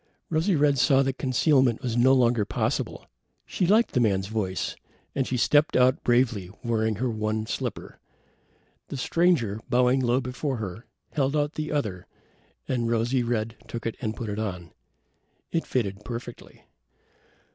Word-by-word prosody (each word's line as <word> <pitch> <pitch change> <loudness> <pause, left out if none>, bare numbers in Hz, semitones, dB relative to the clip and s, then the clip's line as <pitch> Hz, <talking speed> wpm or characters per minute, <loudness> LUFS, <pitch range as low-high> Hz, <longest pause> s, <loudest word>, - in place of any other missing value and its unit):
Rosy 165 +4 +2
red 145 -2 +3
saw 135 +1 +4
that 135 0 -2
concealment 130 -2 +2
was 120 -2 -1
no 125 +2 +5
longer 120 -4 +3
possible. - - -2 0.4
She 180 - -1
liked 220 +5 +4
the 125 - +1
man's 100 -5 +2
voice, 100 -4 -2 0.4
and 135 -2 -1
she 125 - -1
stepped 145 +5 +3
out 130 +1 +3
bravely, 120 -6 +2
wearing 110 -2 0
her 125 +6 -1
one 110 0 -2
slipper. - - -5 0.9
The 140 - -6
stranger, 130 - +1
bowing 125 +1 +3
low 125 0 +2
before 130 +1 -3
her, 110 +1 -6 0.2
held 140 -1 0
out 145 0 0
the 155 0 -4
other, 105 -12 -2 0.6
and 120 -3 0
Rosy 120 +3 +1
red 115 -1 -1
took 115 - -6
it 115 - -2
and 110 -3 -2
put 115 -3 -5
it 105 +1 -3
on. 90 -6 -4 0.8
It 165 - -1
fitted 105 -5 -2
perfectly. 120 0 -8
120 Hz, 155 wpm, -26 LUFS, 110-135 Hz, 0.9 s, no